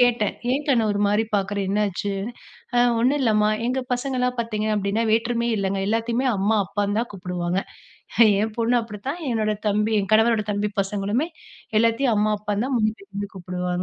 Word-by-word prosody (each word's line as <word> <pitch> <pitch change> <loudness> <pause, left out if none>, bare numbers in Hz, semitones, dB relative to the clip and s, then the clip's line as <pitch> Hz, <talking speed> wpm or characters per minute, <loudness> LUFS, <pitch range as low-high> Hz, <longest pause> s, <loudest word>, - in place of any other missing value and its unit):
கேட்டேன் 240 -4 +3 0.2
"ஏங் 280 +3 0
கண்ணு 240 -5 +3
ஒரு 205 - -1
மாரி 210 +2 +2
பாக்குற 200 0 0
என்னாச்சு?" 200 0 -1 0.6
`ஆ - - +5 0.2
ஒண்ணு 255 +5 +3
இல்லம்மா.' 215 -3 +3 0.2
எங்க 255 +2 0
பசங்கலாம் 250 0 -1
பார்த்தீங்கன்னா 215 -1 0
வேற்றுமையே 235 0 +1
இல்லங்க. 195 0 -1
எல்லாத்தையுமே 230 +4 0
அம்மா 205 +3 +2
அப்பான்னு 205 +1 -1
தா 235 - +1
கூப்பிடுவாங்க. 180 0 -2 0.8
ஏ 210 - +2
பொண்ணு 235 +1 +2
அப்படித்தான் 230 - -6
என்னோட 215 -2 +1
தம்பி 210 +2 +1
ஏ - - +1
கணவரோட 220 0 +3
தம்பி 205 0 -1
பசங்களுமே 205 +8 -1 0.5
எல்லாத்தையுமே 230 +2 +2
அம்மா 210 +1 +2
அப்பான்னு 210 +1 -2 0.6
தா - - -8
கூப்பிடுவாங்க. 180 0 -3
215 Hz, 150 wpm, -23 LUFS, 200-235 Hz, 0.8 s, `ஆ